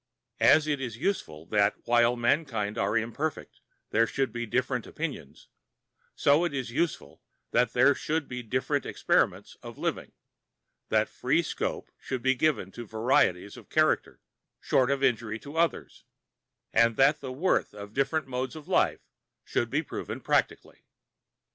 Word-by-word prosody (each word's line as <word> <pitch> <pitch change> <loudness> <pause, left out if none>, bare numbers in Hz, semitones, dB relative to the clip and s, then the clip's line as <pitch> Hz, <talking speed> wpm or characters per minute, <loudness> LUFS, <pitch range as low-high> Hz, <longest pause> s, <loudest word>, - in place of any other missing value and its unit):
As 155 +1 +6
it 145 -3 -1
is 120 -4 -5
useful 80 - -3
that 100 0 +3
while 120 0 +4
mankind 120 -4 0
are 100 +3 +1
imperfect 140 +7 -3 0.3
there 115 +1 +3
should 135 -2 -1
be 120 0 -4
different 125 +1 -1
opinions, 150 - -6 0.7
so 145 +4 +4
it 170 -5 -1
is 130 -3 -3
useful 165 +6 -2 0.3
that 125 -2 +2
there 135 +3 +5
should 155 +2 -2
be 125 0 -5
different 130 +5 -1
experiments - - 0
of - - -10
living, - - -3 0.8
that - - +2
free - - 0
scope - - -4
should 130 -2 -5
be 130 0 +4
given 135 -8 0
to 120 +1 -9
varieties 110 -4 +1
of - - -14
character - - +1 0.4
short 130 -1 +2
of 140 0 0
injury 115 -4 +1
to 145 +6 -11
others, 165 0 -1 0.7
and 115 0 +4
that 140 +4 +4
the 130 -2 -5
worth 160 +9 +1
of 100 0 -9
different 155 +4 0
modes 130 +2 -4
of 155 0 -10
life 190 - +2 0.4
should - - -1
be - - 0
proved - - -6
practically. - - -1
130 Hz, 150 wpm, -28 LUFS, 115-145 Hz, 0.8 s, As